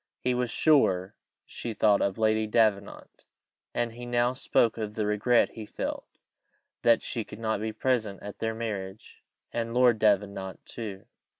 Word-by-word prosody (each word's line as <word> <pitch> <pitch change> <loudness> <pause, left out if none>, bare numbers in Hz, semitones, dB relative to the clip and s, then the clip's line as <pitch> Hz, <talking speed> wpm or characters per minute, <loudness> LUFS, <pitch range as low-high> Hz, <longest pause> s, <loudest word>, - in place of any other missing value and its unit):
He 125 - +2
was 125 -1 -1
sure 105 - +3 0.3
she 115 -2 -6
thought 105 -2 +4
of 100 +1 0
Lady 110 0 +2
Davenant; 105 -3 0 0.5
and 120 -1 -1
he 120 +1 -9
now 120 +1 +2
spoke 115 -3 +1
of 105 -1 -4
the 110 - -1
regret 105 +4 +3
he 110 -2 -9
felt - - -4 0.7
that 115 -1 +4
she 115 - -3
could - - -11
not 110 -2 -1
be 110 0 -2
present 110 -4 -1
at 105 - -8
their 110 0 -2
marriage, 105 -3 -6 0.3
and 115 0 -2
Lord 125 -3 +4
Davenant 100 -2 0
too! 105 -3 -7
110 Hz, 160 wpm, -28 LUFS, 105-120 Hz, 0.7 s, thought